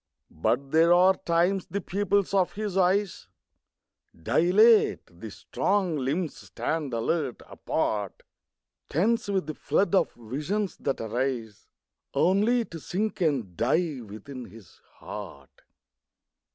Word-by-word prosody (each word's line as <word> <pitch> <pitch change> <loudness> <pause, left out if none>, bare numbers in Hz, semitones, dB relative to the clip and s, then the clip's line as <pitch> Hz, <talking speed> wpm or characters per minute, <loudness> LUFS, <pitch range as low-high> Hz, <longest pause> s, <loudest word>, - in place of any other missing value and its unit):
But 130 - -1
there 165 +2 +5
are 185 +2 +6
times 175 +2 0
the 200 - -3
pupils 200 +1 0
of 190 -2 +2
his 210 -2 -4
eyes 195 +1 +1 0.9
Dilate, 205 - +4
the 110 - -7
strong 180 - -1
limbs 150 +5 -2
stand 155 -4 -3
alert, 125 +3 -2
apart, 105 -3 -2 0.7
Tense 210 +9 +1
with 195 -4 0
the 155 - -4
flood 200 +6 0
of 195 - +3
visions 150 - -3
that 135 - -2
arise 115 -1 -3 0.5
Only 215 +6 +3
to 165 - -9
sink 205 +6 -3
and 130 - 0
die 145 - 0
within 120 +5 -9
his 110 -6 -16
heart. 70 -1 -10
165 Hz, 115 wpm, -27 LUFS, 125-195 Hz, 0.9 s, are